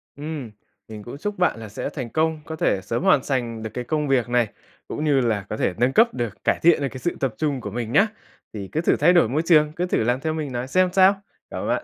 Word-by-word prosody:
Ừm, 145 -5 -6 0.4
mình 110 -1 -9
cũng 120 - -8
chúc 205 +6 -4
bạn 180 -10 +1
là 110 -1 -8
sẽ 105 - -4
thành 130 -5 -6
công, 160 +3 0
có 160 - -6
thể 100 -10 0
sớm 115 - -3
hoàn 150 -8 +4
sành 120 -5 -2
được 110 - -4
cái 125 - -4
công 150 +3 -1
việc 130 -3 +1
này, 120 -2 +2 0.4
cũng 150 - -4
như 145 -3 +3
là 110 -5 0
có 110 - -3
thể 90 - 0
nâng 125 +2 +2
cấp 230 +2 +4
được, 120 -4 -5
cải - - +1
thiện 170 -2 +5
được 140 - 0
cái 130 - -8
sự 175 - -2
tập 135 -4 -1
trung 145 -5 -1
của 105 - -5
mình 115 0 -4
nhá. 200 - +5 0.5
Thì 100 -3 -6
cứ 160 - 0
thử - - +3
thay 175 - +5
đổi 170 -11 +4
môi 145 +5 +1
trường, 150 -3 +4
cứ 180 - -1
thử 180 - 0
làm 120 +3 +1
theo 155 +3 -2
mình 155 -3 -4
nói 125 +1 -3
xem 185 +7 +3
sao. 195 +1 +5 0.3
Cảm - - -5
ơn - - -4
bạn - - 0
135 Hz, 280 wpm, -23 LUFS, 120-160 Hz, 0.5 s, thiện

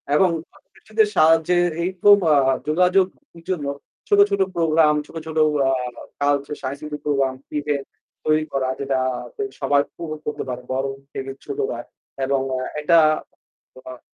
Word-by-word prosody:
এবং 185 +4 +5 0.2
প্রতিবেশীদের 220 -1 -2
সাহায্যে 165 +2 +4 0.3
এই 180 - 0
রকম 205 +3 +6
অ্যাঁ 135 -4 +4
যোগাযোগের 180 +1 +1
জন্য 170 -6 -1 0.4
ছোট, 205 - +4
ছোট 200 -1 0
প্রোগ্রাম, 160 -2 +4
ছোট, - - -16
ছোট 160 0 -5 0.2
অ্যাঁ 130 -2 +1 0.3
কালচার, 145 0 +1
সাংস্কৃতিক 145 +2 -5
প্রোগ্রাম, 135 -2 +1 0.3
ইভেন্ট 145 -2 -2 0.4
তৈরি 155 0 +2
করা 135 -1 0
যেটা 135 -1 0 0.6
সবাই 145 0 +3
পুরো 165 -2 -5
উপভোগ - - -12
করতে 150 - -3
পারে 125 0 -4
বড় 135 +1 -1 0.3
থেকে 135 0 -5
ছোটরা 420 +2 -3 0.5
এবং 135 0 +1 0.4
এটা 170 +3 +4 0.9
অ্যাঁ 130 -1 -9
150 Hz, 135 wpm, -22 LUFS, 135-170 Hz, 0.9 s, রকম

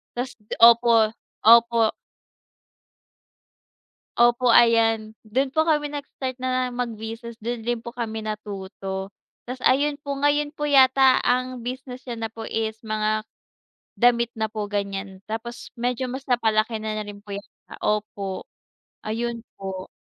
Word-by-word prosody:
Ta's 250 +1 -3 0.3
opo, 230 -1 +7 0.4
opo. 230 0 +6 2.2
Opo 240 0 +4
ayan 225 -2 +4
dun 260 +6 0
po 315 +4 +1
kami 300 -2 +1
nag-start 280 -3 -5
na 255 0 0
mag-business 235 -1 -5
dun 235 0 -4
din 240 -1 -1
po 235 - -7
kami 230 -2 -4
natuto, 195 -2 -5 0.4
ta's 255 - -4
ayun 285 +2 +3
po 280 - -2
ngayon 290 +1 +1
po 295 -1 -2
yata 265 -1 +6
ang 250 -1 0
business 255 0 -6
niya 235 -3 -6
na 225 - -2
po 225 0 -8
is 220 0 -2
mga 215 0 0 0.7
damit 235 -1 +4
na 220 - +1
po 215 -1 -5
gan'yan 195 -1 -3
tapos 225 +2 -6
medyo 245 +1 -1
mas 260 +2 -5
napalaki 225 -2 +2
na 215 0 -3
rin 205 -1 -9
po 200 - -5
yata, 200 +1 -11
opo 200 -3 -2 0.6
ayun 230 +2 -3 0.2
po. 190 -1 -6
235 Hz, 130 wpm, -24 LUFS, 215-255 Hz, 2.2 s, opo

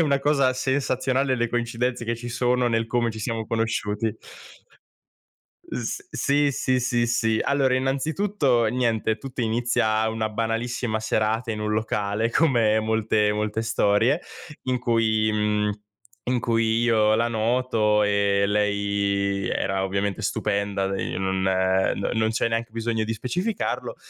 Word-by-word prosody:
una 145 -4 +3
cosa 140 -2 +2
sensazionale, 130 0 0
le 120 -1 0
coincidenze 120 +1 -2
che 115 +1 -2
ci 120 +1 -7
sono 125 +1 +1
nel 115 -1 0
come 120 0 0
ci 110 - -8
siamo 115 -1 -3
conosciuti. 110 -1 -1 1.6
S - - -4
sì, 145 +1 +1
sì, 130 -1 0
sì, 120 -1 +1
sì. 115 -2 +1
Allora 135 -2 +2
innanzitutto: 135 - +1
niente, 115 -2 0
tutto 130 +3 -7
inizia 110 -1 +1
una 110 -1 -2
banalissima 115 +1 -2
serata 110 +2 0
in 105 - -5
un 105 0 -2
locale 105 0 -1
come 115 -9 +3
molte 110 -1 +1
molte 105 +1 -2
storie, 115 +6 +2 0.4
in 130 -1 0
cui, 110 -3 +2
mhmm, 105 0 +1 0.5
in 125 -1 0
cui 115 -1 +1
io 110 -2 +3
la 115 +2 +1
noto. 110 -2 +1
E 100 -1 +2
lei 100 -1 0
era 95 0 -1
ovviamente 100 0 -2
stupenda, 100 -1 -1
de 95 0 -3
non 95 0 -1
non 95 0 +1
non 110 0 +2
c'è 115 - 0
neanche 115 0 -2
bisogno 115 -1 -1
di 110 - -2
specificarlo. 180 - -3
115 Hz, 135 wpm, -24 LUFS, 105-125 Hz, 1.6 s, una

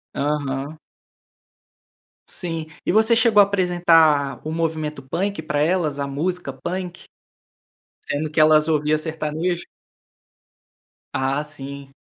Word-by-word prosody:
Aham. 145 0 -2 1.5
Sim. 165 -4 -3 0.2
E - - +1
você 220 +3 +5
chegou 225 -3 +5
apresentar 170 -7 +3
o - - -3
movimento 160 -3 -2
punk 180 +6 -2
pra 150 -1 -2
elas, 155 -3 +1
a 140 - -1
música 155 +1 -2
punk? 175 +6 -5 1.0
Sendo 150 +2 -3
que 155 - -1
elas 155 0 +5
ouviam 155 -1 +2
sertanejo? 160 +2 -3 1.5
Ah, 135 +2 0
sim. 140 -2 -8
155 Hz, 105 wpm, -22 LUFS, 145-175 Hz, 1.5 s, você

